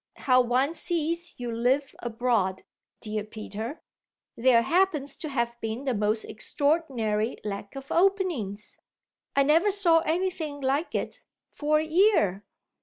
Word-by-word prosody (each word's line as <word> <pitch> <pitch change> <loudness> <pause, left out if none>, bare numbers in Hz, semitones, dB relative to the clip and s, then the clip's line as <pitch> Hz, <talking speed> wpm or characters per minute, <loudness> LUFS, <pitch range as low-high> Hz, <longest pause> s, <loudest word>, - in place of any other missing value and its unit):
"How 255 -1 +4
one 255 +5 +1
sees 335 +1 -1
you 245 -1 -4
live 255 +5 0
abroad, 225 -5 0 0.4
dear 215 -1 -3
Peter! 220 +5 -7 0.5
There 235 -1 +4
happens 325 -4 +1
to 310 - -5
have 235 -3 -2
been 225 +4 -4
the 265 -2 0
most 210 +1 0
extraordinary 240 -3 -1
lack 200 +2 -6
of 270 0 -8
openings 340 - 0 0.6
I 275 - +5
never 325 +8 +4
saw 370 -5 +4
anything 325 -2 -2
like 275 +4 -1
it - - -3 0.3
for 305 +1 +1
a 310 - 0
year. 315 - +3
270 Hz, 130 wpm, -27 LUFS, 225-325 Hz, 0.6 s, I